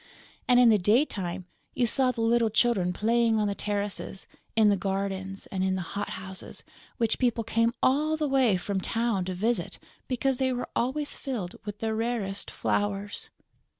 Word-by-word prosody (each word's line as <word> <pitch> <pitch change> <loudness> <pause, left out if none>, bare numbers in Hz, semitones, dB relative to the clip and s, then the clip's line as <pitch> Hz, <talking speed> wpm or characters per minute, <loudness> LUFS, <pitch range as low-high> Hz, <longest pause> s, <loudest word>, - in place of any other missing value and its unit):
And, 250 -1 +6
in 245 -2 +7
the 215 -2 +5
daytime, 190 - +1 0.3
you 250 - +2
saw 255 +2 +2
the 245 -2 -2
little 230 0 +3
children 215 -5 +2
playing 230 +3 +2
on 210 -1 +2
the 200 - 0
terraces, 205 -1 -3 0.3
in 220 -2 +5
the 205 - +4
gardens 195 0 -3
and 190 -1 -1
in 190 0 +1
the 185 - -2
hot 205 +1 -3
houses 190 0 -7 0.3
which 230 -2 +1
people 240 -3 +1
came 230 +1 +2
all 305 +4 +3
the 305 -1 0
way 260 -8 +3
from 190 +1 -2
town 225 -3 0
to 185 0 -3
visit 225 +6 -1 0.3
because 260 +1 0
they 260 0 +1
were 250 -1 -3
always 280 +5 -1
filled 220 -10 -4
with 205 0 -5
the 220 -1 0
rarest 220 -3 -2
flowers. 205 0 -2
220 Hz, 175 wpm, -28 LUFS, 195-240 Hz, 0.3 s, in